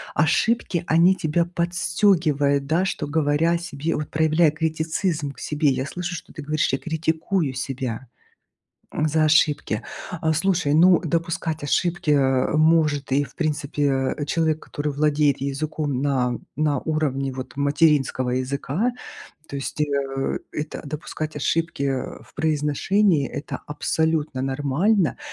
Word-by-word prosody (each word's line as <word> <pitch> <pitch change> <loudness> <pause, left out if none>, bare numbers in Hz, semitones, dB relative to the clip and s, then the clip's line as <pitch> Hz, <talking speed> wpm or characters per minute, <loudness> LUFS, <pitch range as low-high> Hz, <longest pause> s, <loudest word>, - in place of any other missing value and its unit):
ошибки 175 +3 +1
они 170 +4 +5
тебя 170 -1 0
подстёгивают, 170 -5 +1
да, 165 +5 +2
что 155 -5 -3
говоря 150 +2 +2
о 170 - +2
себе 165 -2 -3
вот 150 - -4
проявляя 160 0 +3
критицизм 160 0 -1
к - - -15
себе. 150 -1 +1
Я 130 0 -1
слышу, 180 +4 -4
что - - -10
ты 155 - -7
говоришь: 150 +1 0
"Я 135 - +1
критикую 160 -1 -1
себя, 130 -1 -4 0.9
м, 155 - 0
за 155 +1 +2
ошибки". 150 -7 +2 0.3
А 160 -3 -1
слушай, 165 -2 +1
ну 175 +3 +6
допускать 165 -1 -2
ошибки, 175 +3 0
э, 135 -1 +2
может 155 -3 +3
и 145 +2 +3
в - - -15
принципе, 145 -3 0
э, 145 - -3
человек, 160 0 0
который 145 0 -4
владеет 145 -1 +2
языком 140 0 -2
на 125 -4 0 0.2
на 150 -2 +1
уровне 140 -4 -1
вот 130 +1 -7
материнского 145 -3 +2
языка. 140 - -1 0.5
То 140 - -6
есть, 135 - -5
э, 135 -2 -1
это 150 +1 -4
допускать 155 +1 -5
ошибки, 165 +1 -1
э, 135 -2 -2
в - - -23
произношении 155 +2 +1
это 145 0 -6
абсолютно 155 -1 -1
нормально. 145 - +1
150 Hz, 135 wpm, -23 LUFS, 140-165 Hz, 0.9 s, ну